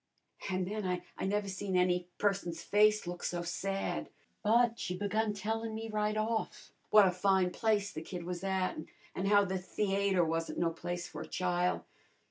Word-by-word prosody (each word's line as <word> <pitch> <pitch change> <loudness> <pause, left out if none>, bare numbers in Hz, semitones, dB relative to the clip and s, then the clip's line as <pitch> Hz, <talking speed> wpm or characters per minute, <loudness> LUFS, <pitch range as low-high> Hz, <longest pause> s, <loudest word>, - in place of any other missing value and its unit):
An' 185 -1 0
then 210 +3 -3 0.4
I - - -1
never 205 +1 0
seen 190 -1 -2
any 180 -1 +2
person's 195 -5 0
face 210 0 +4
look 175 0 -5
so 175 -1 -2
sad. 195 +3 -2 0.3
But 230 +2 +3
she 180 0 -3
begun 215 +2 0
tellin' 220 +2 -2
me 225 0 -5
right 215 0 0
off 220 +1 -2 0.2
w'at 205 -3 +7
a - - -11
fine 190 -1 +3
place 205 -1 +1
the 155 - -6
kid 175 +1 -6
was 180 +1 -5
at, 190 -1 0 0.4
an' 190 - -2
how 205 0 +5
the 190 0 -2
theayter 195 -1 +1
wasn't 165 +1 -2
no 170 -1 +2
place 175 +1 -4
for - - -7
a - - -7
chile. 180 0 0
195 Hz, 175 wpm, -33 LUFS, 180-210 Hz, 0.4 s, w'at